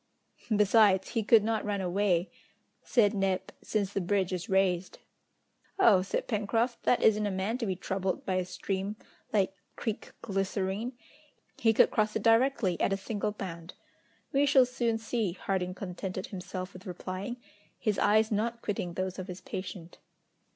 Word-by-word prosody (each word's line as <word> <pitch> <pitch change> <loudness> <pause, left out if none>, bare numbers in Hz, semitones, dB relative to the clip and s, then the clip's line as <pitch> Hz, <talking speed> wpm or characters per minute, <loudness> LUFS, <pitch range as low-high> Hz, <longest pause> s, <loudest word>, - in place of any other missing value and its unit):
"Besides, 205 -2 +4
he 230 - 0
could 215 0 +5
not 220 0 0
run 205 -1 -1
away," 185 -1 +1 0.5
said 215 -4 +3
Neb, 195 -2 -1
"since 205 -2 -1
the 195 - 0
bridge 190 0 0
is 180 -1 -4
raised." 190 -2 +1 0.8
"Oh!" 220 - +6
said 190 - -2
Pencroft, 225 +2 0
"that 245 - +3
isn't 210 -1 +4
a - - 0
man 195 +5 -2
to 230 - -2
be 190 - 0
troubled 190 0 -2
by 185 -1 0
a 185 - 0
stream 190 +2 -3 0.4
like 195 -2 +2 0.2
Creek 220 -2 -4
Glycerine! 195 +3 -2 0.7
He 225 - +4
could 225 - +5
cross 215 0 +1
it 220 - -1
directly, 225 -5 +3
at - - +2
a 195 - +1
single 210 +1 -3
bound!" 170 -4 -7 0.6
"We 280 +1 +4
shall 260 -2 +6
soon 240 -2 0
see," 225 -4 -1
Harding 185 -1 -2
contented 185 0 -5
himself 185 -1 -6
with 185 +1 -11
replying, 185 +6 -5 0.4
his 215 -4 0
eyes 220 +2 +4
not 230 +3 -1
quitting 180 -4 -2
those 185 +1 -3
of 185 - -5
his 180 0 -7
patient. 185 -2 -7
200 Hz, 160 wpm, -30 LUFS, 185-220 Hz, 0.8 s, Oh